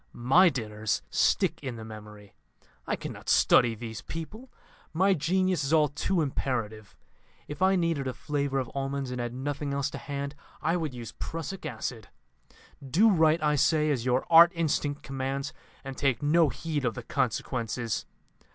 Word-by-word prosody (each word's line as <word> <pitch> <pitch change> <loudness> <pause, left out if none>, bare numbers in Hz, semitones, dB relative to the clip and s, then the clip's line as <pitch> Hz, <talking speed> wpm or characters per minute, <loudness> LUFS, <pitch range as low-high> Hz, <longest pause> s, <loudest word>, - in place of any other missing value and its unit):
My 150 +10 +5
dinners 110 - -2
stick - - +2
in 130 -3 -5
the 110 -1 -8
memory. 105 -2 -11 0.5
I - - 0
cannot - - -7
study 120 -2 +5
these 110 -1 -7
people 215 +11 -8 0.4
my 190 +4 +3
genius 185 +1 +1
is 140 +3 -1
all 155 -2 +4
too 170 +4 0
imperative. 110 -6 -3 0.5
If 145 +2 -8
I 190 +1 +4
needed 165 -6 0
a 130 - -2
flavour 140 -2 -2
of 130 -3 -2
almonds 135 -1 -3
and 125 -1 -3
had 120 -1 -3
nothing 140 +2 -3
else 140 +1 -1
to - - -6
hand, 140 0 -5 0.3
I 165 +3 0
would 155 -7 -3
use 120 -3 -7
prussic 165 +4 -5
acid. 110 -5 -5 0.8
Do 180 - +4
right, 160 -3 +3
I 150 0 +3
say, 150 +1 +3
as 125 -5 -1
your 125 +1 +1
art 170 +1 +8
instinct 150 -3 -1
commands, 135 +1 -3 0.3
and 135 -1 -6
take 135 -2 0
no 160 +1 +4
heed 155 0 -3
of 120 -4 0
the - - -6
consequences. 115 -1 -2
140 Hz, 165 wpm, -28 LUFS, 125-160 Hz, 0.8 s, art